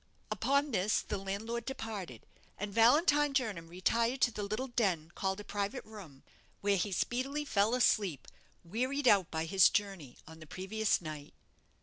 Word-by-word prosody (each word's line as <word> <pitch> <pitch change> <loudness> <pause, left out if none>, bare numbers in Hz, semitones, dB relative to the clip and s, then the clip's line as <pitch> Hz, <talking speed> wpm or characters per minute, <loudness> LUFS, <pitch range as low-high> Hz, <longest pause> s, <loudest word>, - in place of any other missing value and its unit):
Upon 280 +1 +1
this 205 -1 +1
the 205 - -4
landlord 215 +5 -4
departed, 215 - -6 0.3
and 205 0 -5
Valentine 290 - +4
Jernam 210 -11 -1
retired 230 +9 0
to 245 - +4
the 210 - -5
little 215 +6 -3
den 185 -9 0
called 190 0 -2
a - - -7
private 205 +5 -3
room, 185 -11 -12 0.4
where 200 -1 +2
he 195 +3 -1
speedily 265 - -1
fell 215 -2 +2
asleep, 200 - +1 0.4
wearied 255 +9 -1
out 195 -6 +5
by 160 0 -2
his 190 +2 +6
journey 195 - -3
on 160 0 -13
the 155 - -12
previous 200 +5 -1
night. 155 -3 -8
205 Hz, 155 wpm, -32 LUFS, 185-240 Hz, 0.4 s, his